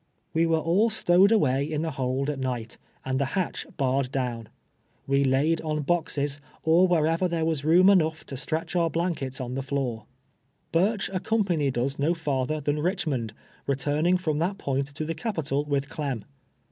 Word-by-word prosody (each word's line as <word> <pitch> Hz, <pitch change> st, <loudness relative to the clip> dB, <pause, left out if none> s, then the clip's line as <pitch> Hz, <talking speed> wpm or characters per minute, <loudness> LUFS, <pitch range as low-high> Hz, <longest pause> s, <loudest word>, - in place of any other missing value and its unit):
We 165 Hz, +1 st, +3 dB
were 165 Hz, 0 st, +3 dB
all 175 Hz, +8 st, +2 dB
stowed 195 Hz, -2 st, +4 dB
away 140 Hz, -, +3 dB
in 155 Hz, +1 st, -2 dB
tlie 160 Hz, -, -2 dB
hold 130 Hz, 0 st, -1 dB
at 140 Hz, -, -6 dB
nii; 125 Hz, -3 st, -1 dB
ht, -, -, -11 dB, 0.3 s
and 130 Hz, 0 st, 0 dB
tlie 140 Hz, -, +1 dB
liatch 185 Hz, +3 st, -3 dB
barred 135 Hz, -1 st, 0 dB
doNvn. 120 Hz, -4 st, -2 dB, 0.6 s
We 140 Hz, 0 st, +2 dB
laid 140 Hz, +5 st, +2 dB
onljoxes, 150 Hz, -2 st, -1 dB, 0.2 s
or 170 Hz, +4 st, +5 dB
where 170 Hz, -4 st, +3 dB
ever 165 Hz, +3 st, +1 dB
there 165 Hz, -2 st, -1 dB
was 160 Hz, -4 st, -1 dB
room 175 Hz, +5 st, +5 dB
enough 160 Hz, -5 st, +3 dB
to 135 Hz, -, -7 dB
stretch 160 Hz, +6 st, -3 dB
our 170 Hz, -2 st, +3 dB
blankets 165 Hz, -6 st, -2 dB
on 125 Hz, -1 st, -4 dB
the 135 Hz, -, -2 dB
lloor. 135 Hz, -5 st, -3 dB, 0.7 s
Burch 195 Hz, +5 st, +2 dB
accompanied 180 Hz, -, 0 dB
iis 135 Hz, +4 st, -1 dB
no 160 Hz, +5 st, +2 dB
farther 150 Hz, -2 st, -1 dB
than 145 Hz, +1 st, -1 dB
Iliclimond, 150 Hz, -, -1 dB, 0.4 s
returning 145 Hz, +6 st, +1 dB
from 155 Hz, -5 st, -1 dB
that 185 Hz, +4 st, 0 dB
point 135 Hz, -5 st, -1 dB
to 145 Hz, +2 st, -5 dB
the 165 Hz, -, -2 dB
capital 150 Hz, -, -2 dB
with 140 Hz, -2 st, -1 dB
Clem. 140 Hz, -8 st, -4 dB
150 Hz, 175 wpm, -26 LUFS, 135-170 Hz, 0.7 s, or